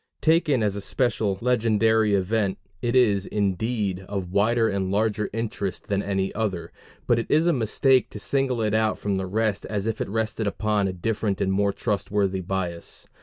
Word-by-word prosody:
Taken 160 -6 +3
as 100 -2 0
a 100 - -4
special 110 -4 0
legendary 110 -3 +3
event, 100 0 0 0.2
it 120 +1 0
is, 105 -6 +3
indeed, 100 0 -1
of 95 -3 -4
wider 115 +4 +3
and 100 -3 -1
larger 105 +1 0
interest 105 -4 -4
than 100 -1 +1
any 95 -1 -1
other, 100 -6 -3 0.3
but 120 - +3
it 115 - -3
is 155 +2 +3
a 175 - +4
mistake 130 +1 +2
to 105 - -8
single 130 0 0
it 105 -1 0
out 110 0 +2
from 100 - -2
the 95 0 -3
rest 110 +1 0
as 105 -1 -2
if 115 -1 -2
it - - -2
rested 110 0 -1
upon 105 -1 0
a - - -1
different 100 +2 -2
and 95 - +1
more 100 +1 +2
trustworthy 100 -2 -1
basis. 90 -2 -4
105 Hz, 180 wpm, -25 LUFS, 100-115 Hz, 0.3 s, a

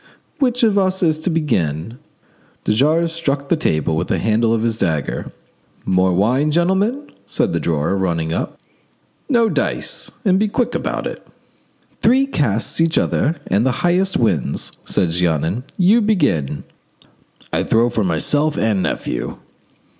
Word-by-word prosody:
"Which 250 -2 +1
of 210 -3 +4
us 190 -1 0
is 155 -2 +2
to 160 - -2
begin?" 115 - -1 0.6
De - - +1
Jars 155 +8 +2
struck 140 -4 -2
the - - +4
table 80 - 0
with 85 +2 -1
the - - 0
handle 110 +1 +1
of 115 -1 +1
his 115 -1 -1
dagger. 80 -7 -2 0.5
"More 95 0 +2
wine, 120 +11 +2
gentlemen?" 190 - 0 0.2
said - - 0
the - - 0
drawer, 80 +3 0
running 85 -4 -1
up. - - -3 0.7
"No, 235 -4 +4
dice; - - -2 0.2
and 190 -1 +4
be 215 - +2
quick 235 +4 -1
about - - -2
it." - - -7 0.7
"Three 260 +4 +4
casts 135 - -1
each 165 -1 +2
and 145 - 0
the 130 - +2
highest 185 +2 +2
wins," 95 - 0
said 90 -5 0
Jeannin. 85 - 0
"You 200 +6 +4
begin." 145 - 0 0.9
"I - - +1
throw 115 +2 +2
for 110 - 0
myself 145 - +1
and 105 -4 +1
nephew." - - -3
130 Hz, 145 wpm, -19 LUFS, -, 0.9 s, of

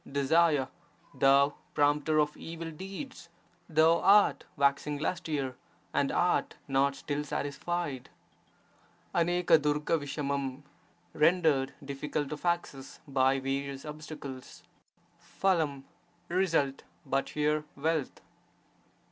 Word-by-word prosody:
Desire, 140 0 +3 0.5
thou 140 +1 +4 0.2
prompter 150 +1 +2
of 150 0 +1
evil 165 0 -7
deeds, 190 - -8 0.4
thou 160 +1 +4
art 205 +2 +5
waxing 140 +1 +1
lustier 145 -4 -2 0.4
and - - +1
art - - +1
not 140 +1 +2
still 145 +1 -3
satisfied. 145 0 -3 1.0
[STOijj'TfWT 150 -5 +1 0.3
— - - -36
rendered 155 -4 +3
difficult 140 +1 -3
of 150 +3 -6
access 145 -6 -2
by 135 -1 +2
various 135 0 -3
obsta 155 +1 -8
cles. 130 -2 -9 0.8
WF 160 -8 +1 0.2
— 175 0 -37
result 165 -7 +1 0.2
(but 135 0 -1
here), 150 0 0
wealth. 155 0 -1
150 Hz, 95 wpm, -30 LUFS, 140-165 Hz, 1.0 s, art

